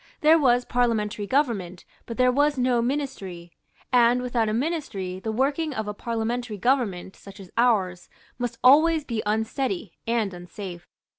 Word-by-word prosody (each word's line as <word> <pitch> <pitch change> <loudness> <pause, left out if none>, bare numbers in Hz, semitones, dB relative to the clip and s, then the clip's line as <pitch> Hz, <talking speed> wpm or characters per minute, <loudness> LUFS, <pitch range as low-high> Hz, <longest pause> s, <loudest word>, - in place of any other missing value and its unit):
There 315 +2 +6
was 245 -3 +3
parliamentary 220 -4 0
government; 205 - -1 0.2
but 230 - -6
there 250 0 +4
was 290 +2 +2
no 250 -1 +2
Ministry; 230 -10 -4 0.4
and, 245 0 +5
without 240 -3 0
a - - 0
Ministry, 225 - -3
the 220 +3 -3
working 280 +5 0
of 220 -3 -3
a 210 - -3
parliamentary 230 +1 -3
government, 205 -6 0
such 195 +1 -13
as 190 -2 -12
ours, 200 -7 +1 0.3
must 240 -1 -3
always 310 +5 +6
be 230 -6 -3
unsteady 220 - -1 0.2
and 225 -4 0
unsafe. 180 0 -9
235 Hz, 150 wpm, -25 LUFS, 200-255 Hz, 0.4 s, There